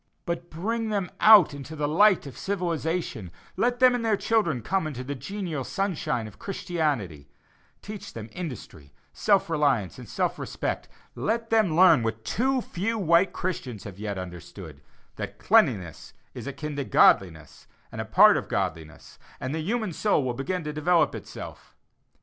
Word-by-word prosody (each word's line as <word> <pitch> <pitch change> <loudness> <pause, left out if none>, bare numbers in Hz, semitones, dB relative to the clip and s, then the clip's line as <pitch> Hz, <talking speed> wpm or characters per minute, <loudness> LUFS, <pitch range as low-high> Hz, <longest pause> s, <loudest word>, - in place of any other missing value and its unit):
But 170 0 -4
bring 220 +8 -2
them 200 -4 -2
out 210 -9 +8
into 145 +3 -8
the 150 -1 -1
light 190 +4 +4
of 135 -4 -9
civilization; 165 - -3 0.3
let 245 0 +1
them 255 0 +6
and 245 -1 -1
their 220 -2 +2
children 170 - 0
come 190 - 0
into 130 -4 -6
the 140 +3 -4
genial 160 - -5
sunshine 175 - -2
of 105 - -12
Christianity; 145 - -3 0.5
teach 210 -1 -8
them 110 -1 -7
industry, 110 - -8 0.2
self 200 -2 +2
reliance, 140 - 0
and - - -11
self - - -1
respect; - - -4 0.2
let 225 +1 -2
them 215 -8 +3
learn 170 -6 +6
what 115 0 -3
too 260 +2 +1
few 225 +3 -3
white 175 -1 +3
Christians 130 - -4
have 100 -1 -10
yet 105 -2 -4
understood, 90 -2 -9 0.4
that - - -6
cleanliness 90 -5 +1 0.2
is - - -8
akin 145 +2 -5
to 140 - -1
godliness, 80 - +2 0.2
and - - -5
a - - -5
part - - +6
of - - -5
godliness; 80 0 -4 0.2
and 130 +2 -4
the 160 - -2
human 215 +1 -2
soul 200 -5 +1
will 125 -2 -1
begin 170 +8 -3
to 150 0 -4
develop 165 +2 +2
itself. - - -9
160 Hz, 160 wpm, -26 LUFS, 125-195 Hz, 0.5 s, out